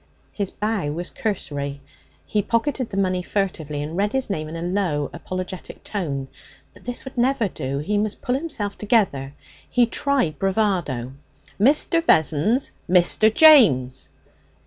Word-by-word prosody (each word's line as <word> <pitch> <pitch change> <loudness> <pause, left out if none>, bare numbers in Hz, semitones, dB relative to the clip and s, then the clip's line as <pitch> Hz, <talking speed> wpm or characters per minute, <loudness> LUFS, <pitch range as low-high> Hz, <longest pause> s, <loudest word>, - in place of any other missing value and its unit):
His 200 -3 -3
bow 210 -8 -2
was 175 +3 -5
cursory. 145 -9 -3 0.5
He 210 - 0
pocketed 235 +4 -1
the 195 - -5
money 185 -2 +1
furtively 160 -7 -3
and 155 +3 -6
read 205 +3 0
his 265 -5 -1
name 155 -5 -3
in 160 - -7
a 165 - -5
low, 175 -6 -1
apologetic 185 +2 -7
tone. 145 -10 -3 0.5
But - - -19
this 245 +2 -3
would 260 -2 -6
never 250 -2 +2
do! 135 -6 -4
He 205 +9 -1
must 215 0 -2
pull 250 - 0
himself 260 -8 -2
together. 180 - +1 0.3
He 245 -1 +4
tried 255 - 0
bravado. 185 - -1 0.5
'Mr. 300 +6 +4
Vessons. 190 - +2 0.2
Mr. 185 +4 +4
James.' 190 - +5
195 Hz, 145 wpm, -22 LUFS, 155-225 Hz, 0.5 s, James